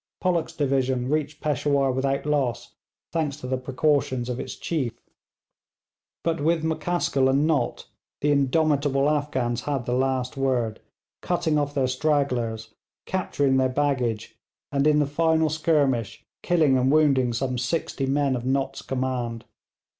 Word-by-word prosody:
Pollock's 175 Hz, -3 st, 0 dB
division 130 Hz, -3 st, 0 dB
reached 150 Hz, 0 st, -1 dB
Peshawur 140 Hz, -2 st, +1 dB
without 135 Hz, +2 st, -1 dB
loss, 125 Hz, -5 st, -1 dB, 0.4 s
thanks 155 Hz, -4 st, -1 dB
to 150 Hz, -, -9 dB
the 130 Hz, 0 st, -1 dB
precautions 130 Hz, -1 st, 0 dB
of 125 Hz, 0 st, -3 dB
its 130 Hz, -, -5 dB
chief; 135 Hz, -9 st, -2 dB, 1.3 s
but 165 Hz, -2 st, -1 dB
with 160 Hz, +1 st, +1 dB
M'Caskill 160 Hz, -4 st, +1 dB
and 140 Hz, +3 st, +3 dB
Nott 155 Hz, -3 st, 0 dB, 0.4 s
the 145 Hz, -, +2 dB
indomitable 140 Hz, 0 st, +2 dB
Afghans 135 Hz, -5 st, 0 dB
had 140 Hz, -4 st, -2 dB
the 125 Hz, -, -1 dB
last 130 Hz, 0 st, 0 dB
word, 125 Hz, -5 st, 0 dB, 0.4 s
cutting 170 Hz, -4 st, 0 dB
off 145 Hz, 0 st, -2 dB
their 135 Hz, -2 st, +2 dB
stragglers, 125 Hz, -5 st, -1 dB, 0.3 s
capturing 145 Hz, -7 st, 0 dB
their 130 Hz, 0 st, +2 dB
baggage, 125 Hz, -5 st, -1 dB, 0.4 s
and 140 Hz, +1 st, +2 dB
in 150 Hz, -1 st, +4 dB
the 150 Hz, -, +3 dB
final 160 Hz, +1 st, +2 dB
skirmish 145 Hz, -8 st, 0 dB, 0.2 s
killing 155 Hz, -7 st, +3 dB
and 130 Hz, +1 st, +2 dB
wounding 140 Hz, -5 st, +3 dB
some 125 Hz, +1 st, -2 dB
sixty 135 Hz, 0 st, -2 dB
men 140 Hz, -1 st, +1 dB
of 120 Hz, -, -4 dB
Nott's 135 Hz, +1 st, -1 dB
command. 125 Hz, -3 st, -3 dB
135 Hz, 140 wpm, -25 LUFS, 130-150 Hz, 1.3 s, in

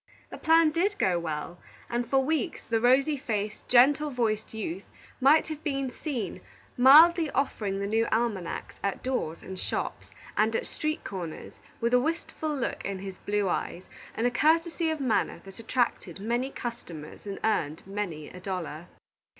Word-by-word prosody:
The -, -, -7 dB
plan 325 Hz, -1 st, +5 dB
did 390 Hz, +6 st, +1 dB
go 180 Hz, -2 st, +2 dB
well, 160 Hz, +1 st, -4 dB, 0.3 s
and 240 Hz, 0 st, -2 dB
for 265 Hz, 0 st, +3 dB
weeks 320 Hz, +3 st, -1 dB
the 225 Hz, -1 st, +1 dB
rosy 270 Hz, +5 st, +4 dB
faced, 215 Hz, -5 st, -3 dB
gentle 275 Hz, +5 st, +5 dB
voiced 225 Hz, -5 st, -1 dB
youth 195 Hz, -4 st, -5 dB, 0.3 s
might 280 Hz, +4 st, +5 dB
have 310 Hz, 0 st, -6 dB
been 275 Hz, -3 st, -1 dB
seen 235 Hz, -, -4 dB, 0.3 s
mildly 315 Hz, +6 st, +7 dB
offering 215 Hz, -8 st, -1 dB
the 200 Hz, -, -1 dB
new 225 Hz, +3 st, +1 dB
almanacs 220 Hz, -6 st, -2 dB
at 200 Hz, -1 st, -2 dB
doors 250 Hz, -11 st, -2 dB
and 190 Hz, 0 st, -7 dB
shops, -, -, -3 dB, 0.3 s
and 220 Hz, +1 st, +2 dB
at -, -, -1 dB
street 305 Hz, 0 st, -3 dB
corners, 175 Hz, -5 st, -6 dB, 0.3 s
with 235 Hz, +1 st, 0 dB
a 250 Hz, -, +7 dB
wistful 320 Hz, +1 st, -2 dB
look 255 Hz, -, -3 dB
in 200 Hz, -1 st, -3 dB
his 190 Hz, 0 st, -8 dB
blue 205 Hz, -1 st, 0 dB
eyes, 180 Hz, 0 st, -2 dB, 0.3 s
and 230 Hz, -, 0 dB
a 245 Hz, -, +3 dB
courtesy 330 Hz, +5 st, +2 dB
of 315 Hz, -1 st, -2 dB
manner 255 Hz, -5 st, 0 dB
that 195 Hz, +3 st, -11 dB
attracted 230 Hz, -7 st, -1 dB
many 240 Hz, +5 st, -1 dB
customers 195 Hz, -, -7 dB
and 200 Hz, -, -4 dB
earned 160 Hz, -8 st, 0 dB
many 190 Hz, -6 st, -4 dB
a 180 Hz, -, -10 dB
dollar. 180 Hz, -3 st, -5 dB
230 Hz, 165 wpm, -28 LUFS, 195-275 Hz, 0.3 s, mildly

